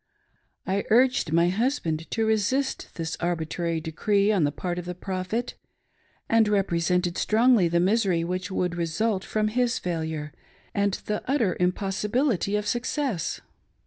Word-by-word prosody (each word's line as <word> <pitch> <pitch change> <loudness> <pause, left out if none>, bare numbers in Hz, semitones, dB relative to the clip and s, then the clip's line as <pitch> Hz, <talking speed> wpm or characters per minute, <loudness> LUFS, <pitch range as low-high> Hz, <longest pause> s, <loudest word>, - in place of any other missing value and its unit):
I 195 +1 0
urged 250 -7 +3
my 170 +2 +4
husband 185 - -1
to 225 -1 0
resist 220 +6 0
this 165 -1 -3
arbitrary 170 -1 -1
decree 200 +6 +1
on 190 -8 +3
the 145 - +1
part 175 +3 -3
of 175 - -7
the 180 0 -5
Prophet, 190 +6 -3 0.7
and 225 -1 +4
represented 180 -3 +1
strongly 225 -3 +4
the 170 +1 +1
misery 190 -2 +2
which 180 +3 -3
would 180 -2 -1
result 185 +4 -1
from 215 0 0
his 245 +2 +1
failure, 160 -3 -3 0.4
and 200 -1 +1
the 210 0 -2
utter 240 -10 +2
impossibility 200 - 0
of 210 0 -1
success. 240 - -2
190 Hz, 140 wpm, -26 LUFS, 170-220 Hz, 0.7 s, my